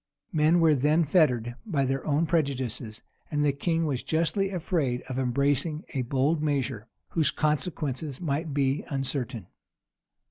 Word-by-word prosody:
Men 160 +2 +4
were 160 -2 +6
then 150 +4 +3
fettered 125 -8 +2
by 150 -11 0
their 135 +1 -1
own 150 +2 +2
prejudices; 130 -8 -1 0.3
and 150 -1 +1
the 145 - +4
king 165 +4 0
was 135 -5 -1
justly 170 +5 0
afraid 160 -9 -1
of 130 0 -4
embracing 140 +5 0
a 135 - -2
bold 135 +5 +1
measure, 135 -7 -1 0.2
whose 155 -4 +2
consequences 150 -2 -2
might 155 -1 -2
be 135 0 +1
uncertain. 130 - -3
145 Hz, 140 wpm, -27 LUFS, 130-160 Hz, 0.3 s, were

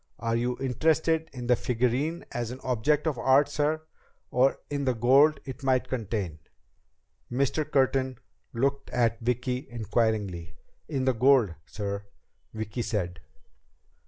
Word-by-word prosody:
"Are 115 0 -1
you 120 +1 0
interested 160 +5 +1
in 125 -2 -7
the 125 +1 +4
figurine 125 +8 -1
as 120 -1 -3
an 125 +2 -7
object 130 +5 +1
of 150 -7 -1
art, 135 +2 +5
sir, 150 +2 0 0.5
or 130 +2 +3
in 140 -1 -1
the 130 -2 +1
gold 135 +7 +5
it 135 0 -7
might 130 -2 +1
contain?" 100 -9 -3 0.9
Mr. 140 +4 0
Curtin 130 -2 +2 0.3
looked 140 +3 -1
at 115 -2 +1
Vicki 125 +3 -1
inquiringly. 105 -6 -1 0.3
"In 135 -4 -1
the 130 - +3
gold, 125 -5 +4
sir," 100 -1 -4 0.4
Vicki 110 +2 -4
said. 100 -6 -2
125 Hz, 130 wpm, -28 LUFS, 115-140 Hz, 0.9 s, art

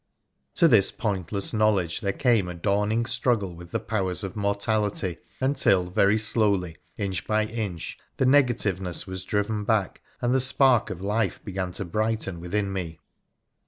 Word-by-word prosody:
To 170 - +6
this 110 -10 +5
pointless 100 -2 -3
knowledge 105 -6 +2
there 100 -3 0
came 115 -5 +2
a 90 - -6
dawning 105 +5 0
struggle 115 -7 0
with 85 0 -11
the - - -2
powers 95 -3 -1
of 95 - -5
mortality, 100 -2 0 0.2
until 115 -10 +2
very 100 +3 +3
slowly, 100 -6 0 0.2
inch 95 -4 -3
by 110 0 +2
inch, 105 -7 -5 0.2
the - - +2
negativeness 115 -10 +2
was 95 -1 -6
driven 105 +1 -1
back, 105 -3 0 0.2
and 120 +1 +1
the 130 - +3
spark 130 -3 +4
of 95 -2 -6
life 105 -1 -1
began 95 -3 -3
to 100 - -3
brighten 105 -1 -2
within 95 +3 -2
me. 85 -4 -4
100 Hz, 155 wpm, -25 LUFS, 95-110 Hz, 0.2 s, To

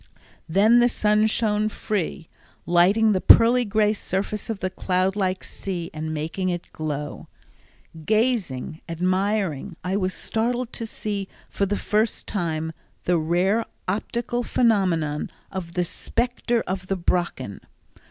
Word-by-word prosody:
Then 210 +8 +5
the 240 0 +5
sun 210 -1 +3
shone 215 -1 +1
free, 195 -6 -3 0.4
lighting 190 +6 +4
the 190 -2 +1
pearly 240 +2 +7
gray 210 0 +2
surface 205 +1 -3
of 225 - -2
the 185 -1 -3
cloud 185 0 0
like 190 -2 -1
sea 175 -4 -5
and 155 0 -4
making 160 +5 -2
it 175 -1 -4
glow. 150 -2 -4 0.8
Gazing, 215 - 0
admiring, 185 0 0
I 185 +2 -1
was 185 -2 -1
startled 240 +2 -1
to 230 - -3
see 205 -3 -4 0.2
for 200 - 0
the 205 +1 0
first 215 +1 0
time 160 -4 -2 0.3
the 175 -1 +2
rare 180 +7 +2 0.2
optical 235 +5 -1
phenomenon 180 -12 +1 0.2
of 175 -3 -5
the 180 0 +1
"Specter 240 +5 -1
of 185 0 -4
the 195 - -1
Brocken." 170 - -1
195 Hz, 135 wpm, -24 LUFS, 175-215 Hz, 0.8 s, pearly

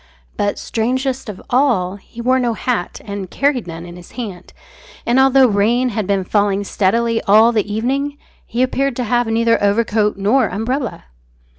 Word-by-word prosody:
But, 205 -1 -1
strangest 255 +2 -2
of 200 - -7
all, 235 -8 +2
he 230 +4 -11
wore 255 +2 +2
no 240 -2 0
hat, 230 -6 -2
and 200 -3 -5
carried 275 -7 0
none 165 0 -7
in 175 0 -10
his 175 - -14
hand; 205 -8 -7 0.5
and 240 +2 +3
although 265 0 +5
rain 235 +4 +2
had 215 -4 -3
been 200 -1 +1
falling 200 +1 +1
steadily 225 +4 +1
all 220 +3 +6
the 215 -2 -1
evening, 275 +7 -1 0.3
he 240 +3 0
appeared 270 0 0
to 250 - -2
have 240 +1 +1
neither 230 +1 +2
overcoat 210 0 +1
nor 215 +7 +2
umbrella. 240 +6 -3
225 Hz, 165 wpm, -18 LUFS, 200-250 Hz, 0.5 s, all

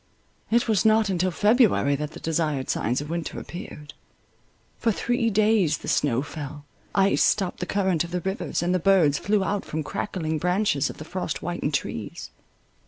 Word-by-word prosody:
It 235 +2 +2
was 215 -4 +2
not 220 -1 +4
until 185 0 +1
February 205 - +3
that 150 +2 -4
the - - -9
desired 155 -4 -1
signs 125 +5 -1
of 150 +2 -6
winter 170 -1 -3
appeared. 150 -4 -9 0.9
For 230 - +2
three 235 +2 0
days 210 -7 +3
the - - -10
snow 130 -2 +1
fell, 145 -1 -8 0.3
ice 195 0 +3
stopped 190 -4 +1
the 180 - -3
current 190 -5 +1
of 170 - -7
the 180 0 -2
rivers, 190 -1 -2
and 175 +1 +1
the 185 - +2
birds 170 -6 +4
flew 205 -1 +1
out 200 +1 -1
from 155 0 -4
crackling 160 -1 -3
branches 180 -4 +1
of - - -8
the 155 - -8
frost 180 +3 -3
whitened 175 -4 -2
trees. 135 - -4
180 Hz, 175 wpm, -25 LUFS, 150-200 Hz, 0.9 s, not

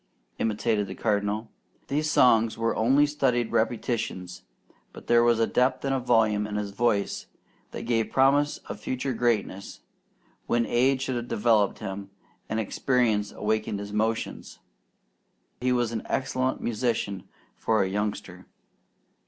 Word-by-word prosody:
imitated 110 -1 0
the 95 - -7
Cardinal. 105 +1 -1 0.4
These 150 +2 0
songs 115 -6 +4
were 115 0 0
only 135 +6 +4
studied 130 -5 0
repetitions, 110 -5 -2 0.5
but - - -12
there 120 0 +4
was 120 -1 +3
a 115 - +4
depth 130 +2 +1
and 135 -2 0
volume 110 -4 +2
in 105 - -5
his 105 -1 -3
voice 105 -2 0 0.4
that - - -7
gave 115 -1 0
promise 140 +2 +3
of - - -6
future 130 +1 -3
greatness, 110 -5 -1 0.7
when 120 0 +2
age 130 +2 +2
should 130 -2 -2
have 120 0 -4
developed 105 -3 +2
him, 100 -1 -6 0.4
and 110 - -1
experience 110 -1 +1
awakened 110 -1 -1
his 100 0 -7
emotions. 110 +2 -2 1.0
He 125 +1 0
was 120 -2 +1
an 110 -2 -3
excellent 130 -1 -1
musician 110 -4 -2 0.3
for 110 -2 +1
a - - -1
youngster. 100 -2 -4
115 Hz, 135 wpm, -26 LUFS, 105-125 Hz, 1.0 s, songs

